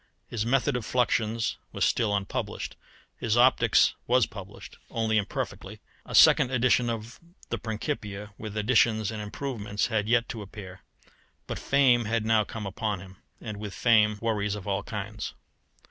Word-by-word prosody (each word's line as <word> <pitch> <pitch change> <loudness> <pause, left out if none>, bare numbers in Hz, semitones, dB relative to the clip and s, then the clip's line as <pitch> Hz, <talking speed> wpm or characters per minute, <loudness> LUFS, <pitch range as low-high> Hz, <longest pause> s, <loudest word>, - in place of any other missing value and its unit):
His 115 0 -3
method 135 +2 +2
of 125 - -2
fluxions 115 -2 0
was - - +1
still 105 -3 +1
unpublished; 100 -1 -3 0.4
his 115 0 0
optics 125 +2 +5
was 125 -1 +4
published 100 -3 -11
only 110 -1 0
imperfectly; 100 - -5 0.3
a - - -4
second - - +7
edition 125 -1 +2
of 115 +1 -5 0.3
the - - -2
Principia, 105 -3 -4
with 110 0 -7
additions 110 -1 +2
and 110 -1 -5
improvements, 105 -2 -3
had 105 -1 0
yet 120 0 +3
to 115 - -5
appear; 95 -2 -10 0.6
but - - -5
fame 130 -4 +3
had 110 0 0
now 110 -1 +4
come 110 0 -7
upon 100 +1 -2
him, 95 0 -12 0.2
and 105 -3 -6
with 105 -2 -6
fame 110 -3 +4
worries 105 -2 0
of 105 -1 -8
all 100 0 0
kinds. 105 0 -6
110 Hz, 155 wpm, -27 LUFS, 105-115 Hz, 0.6 s, second